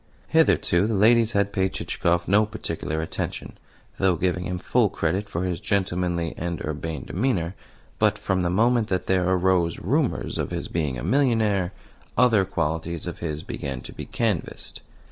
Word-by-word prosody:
Hitherto 90 +4 +3
the 110 - 0
ladies 115 +2 +4
had 100 0 +1
paid 95 0 0
Chichikov 85 0 0
no 105 +3 +5
particular 80 -7 -3
attention, 80 - -5 0.4
though 95 -2 +3
giving 90 +1 -1
him 90 0 -2
full 110 +5 +2
credit 95 +6 -1
for 85 - -2
his 90 -2 -2
gentlemanly 90 -4 -1
and 85 -1 -3
urbane 75 -2 -4
demeanour; 95 -5 -1 0.5
but - - +3
from 95 -1 0
the 85 - +1
moment 115 +4 +3
that 95 -3 -1
there 95 -1 +2
arose 90 -2 +2
rumours 135 - -1
of - - -1
his - - -4
being 75 -6 -1
a - - -6
millionaire 110 -9 +2 0.5
other 115 -5 +5
qualities 80 -2 -2
of 85 - -6
his 80 -2 -4
began 65 -3 -4
to - - -9
be - - -7
canvassed. 110 -7 -2
90 Hz, 165 wpm, -25 LUFS, 85-105 Hz, 0.5 s, no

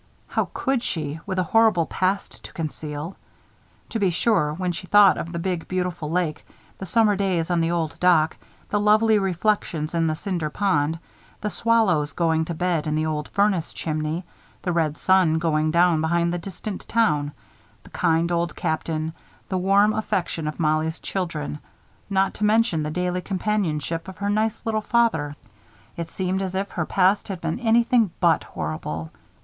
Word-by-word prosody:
How - - -1
could 265 -3 0
she, 155 -7 -3
with 190 - -2
a 185 - +2
horrible 215 -3 +3
past 190 +4 -2
to - - -11
conceal? 155 +1 -5 0.7
To 225 - -2
be 195 -3 +3
sure, 180 -3 +2
when 180 +3 -2
she 185 +2 -7
thought 205 0 +7
of 170 - -5
the 170 - -4
big, 175 -1 -2
beautiful 180 -4 -2
lake, 165 -2 -1 0.4
the 190 - -6
summer 215 +2 +3
days 185 -4 0
on 175 -1 +2
the 165 - +1
old 165 -2 -2
dock, 165 -3 +4 0.3
the 205 - +1
lovely 215 +1 +4
reflections 180 -4 -1
in 165 -1 +1
the 155 - 0
Cinder 175 -4 -3
Pond, 160 -4 +1 0.4
the 210 - -2
swallows 190 -12 +2
going 160 -2 +1
to 170 - -4
bed 170 -2 0
in 150 - 0
the 155 0 0
old 150 -2 -2
furnace 200 -5 +1
chimney, 155 +2 -3 0.4
the 180 - 0
red 160 -3 0
sun 185 -4 +3
going 155 -1 +1
down 170 0 +3
behind 170 +1 +1
the 175 - -2
distant 195 +3 -7
town, 150 -11 +1 0.5
the - - -16
kind 165 +1 +1
Old 170 -1 0
Captain, 160 0 -2 0.4
the 190 - 0
warm 200 +3 +4
affection 175 -7 -2
of 150 - -5
Mollie's 155 0 +1
children, 160 -6 -4 0.5
not 195 -1 +2
to - - -5
mention 210 -6 +3
the 150 - -2
daily 180 +2 -1
companionship 175 -5 -2
of 190 - -9
her 200 0 -1
nice 215 +2 0
little 220 -1 0
father, 225 -12 +1 0.6
it 170 -1 -5
seemed 190 +2 -2
as 190 -1 -3
if 195 +1 -2
her 170 -3 -2
past 195 +2 +2
had 195 -3 -5
been 165 +5 -3
anything 235 -1 +3
but 170 -3 +3
horrible. 80 0 -5
175 Hz, 175 wpm, -24 LUFS, 160-200 Hz, 0.7 s, thought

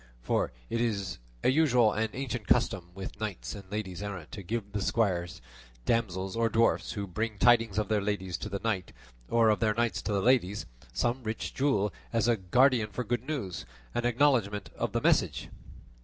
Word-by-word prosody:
For - - +1 0.2
it 115 - -1
is 100 - -1 0.2
a - - +4
usual 125 -7 +4
and 110 +1 0
ancient 125 -4 -4
custom 95 -7 +2
with 95 -1 -7
knights 105 -5 -4
and 100 -2 -10
ladies 100 -4 -4
errant 95 -6 -6
to 100 - -6
give 100 +1 -4
the 105 0 -2
squires, 90 - 0 0.4
damsels, 95 -5 0
or 115 0 +2
dwarfs 115 +1 +2
who 100 -1 -3
bring 105 +4 -3
tidings 115 -3 +4
of 105 - +1
their 110 -1 +1
ladies 95 -3 -2
to 105 - -5
the 100 0 -3
knights, 100 -6 -1 0.4
or 115 -1 +4
of 105 - +1
their 110 -1 +2
knights 120 0 0
to - - -3
the 100 - +2
ladies, 110 -5 +2 0.3
some 120 +2 0
rich 110 -1 -4
jewel 105 -8 +1 0.2
as 115 -1 +2
a 120 - +4
guerdon 115 +4 +3
for 125 +5 -3
good 120 +2 -2
news,' 95 - -3 0.3
and 120 - -1
acknowledgment 120 -6 +2
of - - -2
the - - +1
message." - - +2
110 Hz, 185 wpm, -30 LUFS, 100-120 Hz, 0.4 s, a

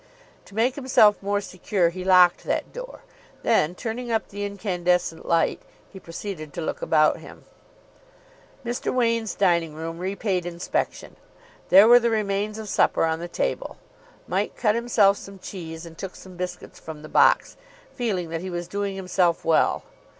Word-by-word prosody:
To 200 - -15
make 235 +4 +2
himself 255 -7 +4
more 205 +1 0
secure 185 -2 0
he 185 +1 -6
locked 180 -2 +5
that - - -2
door; - - -9 0.4
then, 165 +4 +2
turning 235 +3 -4
up 225 - -1
the 205 +1 -5
incandescent 180 -4 -1
light, 165 -1 +1 0.3
he 190 - -9
proceeded 165 -3 -7
to 170 - -3
look 160 - -4
about 155 -1 +3
him. - - -13 1.2
Mr. 240 +1 -2
Wain's 230 -3 0
dining 170 -5 +1
room 165 +1 -6
repaid 190 -1 -2
inspection. 175 0 -3 0.5
There 195 +4 +8
were 240 +1 +8
the 235 0 +1
remains 210 -1 -1
of 220 -1 -7
supper 195 - +2
on 160 0 -1
the 175 - -5
table. - - -3 0.5
Mike - - -1
cut 215 -3 +2
himself 220 -4 +3
some 195 0 -11
cheese 165 -3 -8
and 165 -1 -11
took 190 +2 -7
some 185 -1 -12
biscuits 180 0 -6
from 155 -1 -9
the - - -8
box, - - +3 0.4
feeling 195 -9 -2
that 165 0 -4
he 185 - -5
was 175 -1 -4
doing 200 +1 -3
himself 180 -2 0
well. 160 -1 +2
190 Hz, 165 wpm, -24 LUFS, 170-215 Hz, 1.2 s, There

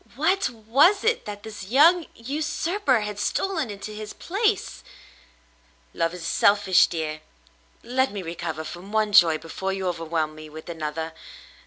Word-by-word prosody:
What! 340 +7 +2
Was 260 - +3
it 455 +1 +1
that 205 -1 -7
this 215 -3 -8
young 320 - +5
usurper 300 - 0
had 210 -1 -5
stolen 320 - -1
into 205 +1 -7
his 215 0 -7
place? 415 +3 -1 1.1
"Love 165 +1 -1
is 175 -2 -8
selfish, 200 +1 +4
dear. 155 -2 -4 0.6
Let 260 +1 +1
me 200 -2 -5
recover 165 -1 -5
from 175 +5 -9
one 215 -1 +1
joy 170 -6 +7
before 190 +4 -4
you 190 -1 -3
overwhelm 165 -2 -2
me 155 0 -11
with 155 +2 -10
another. 160 0 -4
205 Hz, 145 wpm, -25 LUFS, 165-270 Hz, 1.1 s, joy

